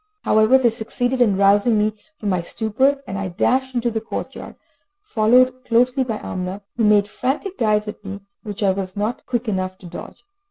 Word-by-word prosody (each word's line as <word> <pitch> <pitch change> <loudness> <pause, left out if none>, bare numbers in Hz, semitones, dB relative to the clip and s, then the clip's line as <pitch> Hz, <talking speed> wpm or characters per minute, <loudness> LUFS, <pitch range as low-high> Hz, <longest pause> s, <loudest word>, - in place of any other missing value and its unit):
However 220 +4 +5
they 245 -3 +3
succeeded 245 +3 -2
in 205 -5 +4
rousing 205 +3 +4
me 210 +1 +1 0.2
from 210 - -3
my 185 -2 +1
stupor, 260 +10 0
and 195 0 -5
I 195 - -2
dashed 255 +8 0
into 240 0 0
the 220 0 -2
court 225 - -5
yard, - - -9 0.5
followed 255 - +3
closely 250 +3 +2
by 225 -4 -3
Amina, 185 +1 -5
who 230 - +1
made 205 -1 +4
frantic 270 - -3
dives 215 - +1
at 210 - -7
me, 195 0 -7 0.2
which 210 -2 -5
I 195 - +4
was 190 0 -4
not 215 +4 -2
quick 240 -1 -2
enough 185 -2 -2
to 190 - -15
dodge. 175 0 -10
215 Hz, 195 wpm, -21 LUFS, 200-245 Hz, 0.5 s, However